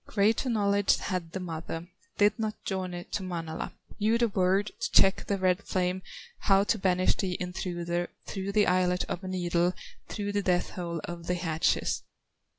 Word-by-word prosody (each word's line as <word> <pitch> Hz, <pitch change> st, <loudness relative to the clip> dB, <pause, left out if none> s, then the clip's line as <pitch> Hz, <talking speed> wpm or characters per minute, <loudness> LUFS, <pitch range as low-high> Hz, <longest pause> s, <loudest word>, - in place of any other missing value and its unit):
Greater 220 Hz, +5 st, +2 dB
knowledge 205 Hz, -3 st, +3 dB
had 180 Hz, -4 st, -3 dB
the 190 Hz, -, -4 dB
mother, 165 Hz, -1 st, -5 dB, 0.3 s
Did 205 Hz, +1 st, +4 dB
not 215 Hz, -1 st, -3 dB
journey 185 Hz, -2 st, -3 dB
to -, -, -1 dB
Manala, 165 Hz, -3 st, -4 dB, 0.3 s
Knew 220 Hz, +2 st, +3 dB
the 235 Hz, -1 st, +2 dB
word 195 Hz, +1 st, +2 dB
to 230 Hz, -, -2 dB
check 195 Hz, -, +5 dB
the 200 Hz, -, +1 dB
red 185 Hz, 0 st, +2 dB
flame, 185 Hz, -1 st, -1 dB, 0.4 s
How 195 Hz, -1 st, +4 dB
to 210 Hz, +1 st, +1 dB
banish 185 Hz, -1 st, +3 dB
the 185 Hz, -2 st, -1 dB
intruder 175 Hz, -1 st, -2 dB, 0.2 s
Through 195 Hz, 0 st, -4 dB
the 210 Hz, -1 st, +5 dB
eyelet 180 Hz, 0 st, +2 dB
of 180 Hz, -, -4 dB
a -, -, -5 dB
needle, 175 Hz, -1 st, +1 dB, 0.3 s
Through 205 Hz, -1 st, -3 dB
the 205 Hz, 0 st, +1 dB
death 180 Hz, -2 st, +1 dB
hole 170 Hz, -3 st, -4 dB
of 170 Hz, -1 st, -6 dB
the 180 Hz, -, +1 dB
hatchet." 165 Hz, -1 st, +1 dB
185 Hz, 170 wpm, -29 LUFS, 175-200 Hz, 0.4 s, check